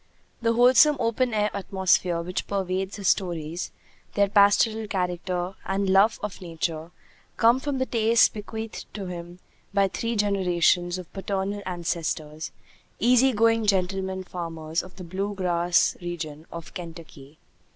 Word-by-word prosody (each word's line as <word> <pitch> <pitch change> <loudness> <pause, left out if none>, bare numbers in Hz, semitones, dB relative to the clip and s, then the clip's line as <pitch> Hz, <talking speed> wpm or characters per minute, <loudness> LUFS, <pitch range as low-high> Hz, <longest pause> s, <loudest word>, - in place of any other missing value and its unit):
The 230 0 +2
wholesome 255 +5 +6
open 240 +1 +1
air 210 -1 +1
atmosphere 185 -3 +1
which 180 +2 -4
pervades 190 0 -2
his 200 -3 0
stories, 170 -2 -1 0.4
their 200 0 +4
pastoral 210 +2 +4
character 180 -1 -2
and 195 +1 -1
love 200 +4 +4
of 210 -2 -5
nature, 165 -2 -4 0.5
come 235 +3 +5
from 280 0 -2
the 260 - 0
tastes 230 -1 +4
bequeathed 220 +1 -7
to 200 -2 -4
him 175 -1 -7 0.4
by 200 -1 +4
three 230 +4 -2
generations 180 -3 +2
of 180 -2 -10
paternal 195 +1 -3
ancestors, 165 -3 -3 0.5
easy 250 +2 +5
going 225 -1 +2
gentlemen 190 -1 0
farmers 165 -3 -4
of 185 - -13
the 185 - -9
blue 195 +4 -3
grass 175 -2 +2
region 160 -3 -6
of 170 -1 -9
Kentucky. 160 -4 -10
190 Hz, 135 wpm, -25 LUFS, 175-210 Hz, 0.5 s, wholesome